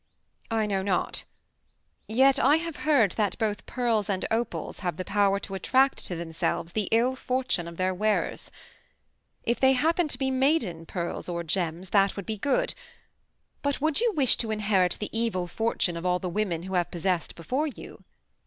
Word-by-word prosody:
"I 225 -1 +1
know 195 -2 0
not. 190 -2 -1 0.8
Yet 265 +5 +4
I 275 +5 +5
have 330 -1 -3
heard 245 - +5
that 210 0 -1
both 210 -4 -2
pearls 230 -5 0
and 190 -2 -1
opals 230 +2 -2
have 175 -4 -3
the 185 - -4
power 200 -1 +2
to 195 - -7
attract 265 +8 +2
to 180 - -4
themselves 165 0 -2
the 210 0 -1
ill 240 +3 +3
fortune 255 -9 -1
of 170 -1 -9
their 185 0 +1
wearers. 215 +3 -1 0.9
If 235 - 0
they 265 0 +5
happen 325 +5 +2
to 265 - -3
be 265 0 0
maiden 260 - +1
pearls 175 0 -4
or 170 -1 -2
gems 175 +1 -2
that 200 -1 +3
would 200 - -6
be 220 - -3
good; 485 - +1 0.9
but 285 -1 -1
would 310 +3 +2
you 475 -1 +3
wish 265 -4 +5
to 225 - -2
inherit 200 -4 +2
the 210 - -5
evil 225 -6 0
fortune 180 -2 0
of 170 - -5
all 180 0 +2
the 180 - -4
women 175 -3 -1
who 190 +1 -6
have 175 -2 +1
possessed 175 0 -1
before 260 - -1
you?" 285 - -10
210 Hz, 180 wpm, -27 LUFS, 180-260 Hz, 0.9 s, I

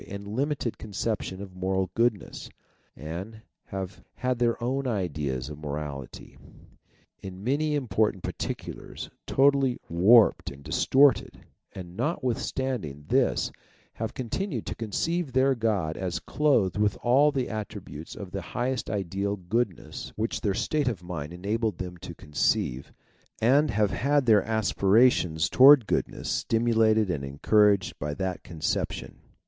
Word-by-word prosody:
and 100 +1 -7
limited 130 +2 -2
conception 105 -2 -3
of 95 -2 -11
moral 95 0 -1
goodness, 115 -4 -1 0.5
and 90 +8 -7 0.3
have 95 -1 -6
had 125 +3 -1
their 120 -1 +2
own 135 +2 -1
ideas 75 - -2
of 75 -1 -8
morality, 75 -3 -7 0.8
in 95 0 -8
many 150 +5 +1
important 110 -7 0
252 - - -5 0.3
THEISM - - -10
particulars, - - -9 0.2
totally 135 -2 +3
warped 105 +7 +5
and 70 +1 -12
distorted, 130 - +3 0.3
and 90 -2 -9
notwith 130 - -1
standing 100 - -3
this - - +2 0.4
have 110 0 -5
continued 130 - -3
to - - -3
conceive 145 - -2
their 130 +1 +4
God 105 -9 -1
as 90 -3 -2
clothed 115 - +1
with 105 -2 +1
all 135 +5 +5
the 130 -3 -1
attributes 100 -7 -7
of 95 -3 -8
the 100 - -4
highest 125 +1 -3
ideal 100 0 -2
goodness 100 +1 -3
which 110 +2 -2
their 100 -3 0
state 145 +5 0
of 110 -8 -2
mind 85 -4 -5
enabled 105 +3 -2
them 90 -1 -6
to - - -9
conceive, 70 -3 -1 0.5
and 140 +6 +4
have 105 -1 +1
had 140 +5 +1
their 110 -3 +6
aspirations 100 -5 +3
towards 135 0 +8
goodness - - -2
stimulated 110 -3 +2
and 70 -5 -3
encouraged 100 +8 +2
by 75 0 -3
that 95 0 -3
concep 80 -3 -2
tion. - - -8
105 Hz, 140 wpm, -27 LUFS, 90-125 Hz, 0.8 s, towards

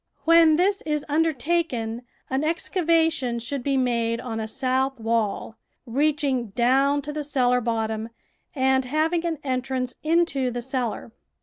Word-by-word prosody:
When 330 -1 +6
this 390 +4 +2
is 300 -2 -2
undertaken, 295 -6 0 0.3
an 265 +1 -1
excava 330 0 +1
tion 250 -7 -2
should 250 +4 -4
be 275 +2 0
made 235 -2 0
on 230 -3 -4
a 220 - -3
south 265 +2 -1
wall, 225 -1 -1 0.3
reaching 275 -1 0
down 265 +6 +2
to 295 - -5
the 300 0 -3
cellar 250 -3 +1
bottom 220 -1 -2 0.5
and 265 -1 +2
having 315 +5 0
an 325 -2 -2
entrance 255 -1 -2
THE - - -39
VEGETABLE 330 - +4
GARDEN 340 - +6 0.3
into - - -1
the 245 0 -4
cellar. 250 -3 -3
265 Hz, 160 wpm, -24 LUFS, 240-305 Hz, 0.5 s, When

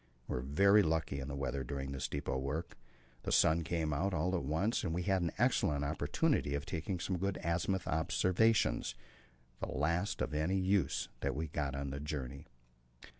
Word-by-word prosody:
We - - -3
were 60 - -1
very 100 +10 +5
lucky 80 -5 0
in 65 - -5
the 70 - -4
weather 70 -1 -2
during 70 +1 -4
this 65 -1 -2
depot 70 -2 -2
work; 75 +6 -3 0.5
the - - -3
sun 80 +2 +4
came 80 -2 -1
out 90 +6 0
all 90 +4 +1
at 85 - -1
once, 80 - 0
and 80 -3 -1
we 90 - -1
had 95 0 +2
an 85 -2 0
excellent 70 -1 +2
opportunity 75 - +1
of 70 0 -3
taking 90 +1 -3
some 90 +1 -2
good 100 0 -1
azimuth 85 +2 0
observations, 90 - +2 0.6
the - - -3
last 85 +8 0
of - - -3
any 80 +6 +1
use 95 -6 +1
that - - -1
we 80 +1 -3
got 70 -2 -2
on 70 0 -3
the 70 - -4
journey. 70 0 -5
80 Hz, 185 wpm, -34 LUFS, 70-90 Hz, 0.6 s, very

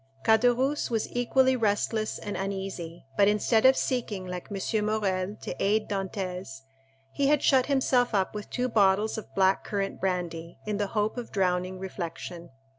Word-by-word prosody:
Caderousse 245 +6 +3
was 225 -2 0
equally 260 +2 +3
restless 215 -1 0
and 205 - -5
uneasy, 190 -4 -5
but 200 - +5
instead 220 +3 +4
of 265 - +5
seeking, 220 -7 -2
like 180 -1 -6
M. 210 +2 -1
Morrel, 200 -2 -1
to - - -4
aid 215 +2 +2
Dantès, 185 -7 -4 0.5
he 280 - +1
had 295 0 +3
shut 260 -2 +4
himself 255 -4 +2
up 190 -1 +1
with 210 -1 -6
two 250 0 -1
bottles 210 -1 +2
of - - -13
black 190 0 +3
currant 200 -1 -3
brandy, 175 -3 -3
in 210 -1 -2
the 205 0 0
hope 210 +3 +1
of 245 - -6
drowning 185 -1 0
reflection. 175 -2 -6
205 Hz, 160 wpm, -28 LUFS, 185-230 Hz, 0.5 s, but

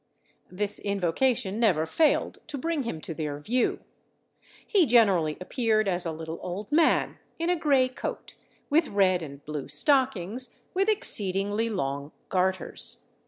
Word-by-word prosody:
This 205 +2 -1
invocation 200 +2 0
never 180 -9 +3
failed 305 - +1
to 300 -2 -5
bring 325 +2 -1
him 230 -11 -4
to 165 - -5
their 150 -2 -4
view. 235 +12 0 0.8
He 380 -8 +3
generally 195 -10 +4
appeared 215 +1 +1
as 180 -2 0
a - - -1
little 160 +1 -6
old 195 +7 -6
man, 320 +1 +3 0.2
in 335 +2 0
a - - +3
grey 280 -6 +3
coat, 255 - -6 0.3
with 315 +2 +3
red 190 -3 +2
and 140 -2 -9
blue 150 -2 -5
stockings, 255 - 0 0.2
with 390 +3 +2
exceedingly 205 - +1
long 140 -7 -3 0.2
garters. 185 0 -1
205 Hz, 140 wpm, -27 LUFS, 170-260 Hz, 0.8 s, generally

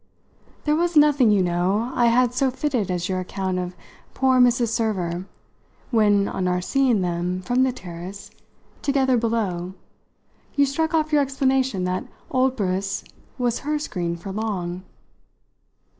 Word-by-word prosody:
"There 300 0 +2
was 340 0 +1
nothing, 290 -5 +5
you 200 -3 +4
know, 185 +7 0
I 240 -2 +3
had 245 +1 +3
so 265 +1 +2
fitted 255 -6 -1
as 180 -1 -1
your 185 -1 -1
account 185 0 -3
of 180 0 -4 0.4
poor 260 -1 +3
Mrs. 245 -1 +4
Server 190 -6 -1 0.6
when, 205 -3 +3
on 185 - -2
our 180 0 +1
seeing 250 +2 +2
them, 180 +1 -2
from 245 +6 +1
the 260 0 +3
terrace, 180 -2 -9 0.5
together 270 -2 +2
below, 205 -6 -1 0.8
you 285 -1 +4
struck 320 +4 -1
off 310 -1 +1
your 295 - +5
explanation 265 -6 +1
that 180 0 -2 0.3
old 260 0 +2
Briss 195 -1 -2 0.3
was 245 -2 0
her 300 +1 -1
screen 175 - -3
for 175 +3 -7
Long." 190 -4 -3
220 Hz, 145 wpm, -23 LUFS, 185-260 Hz, 0.8 s, nothing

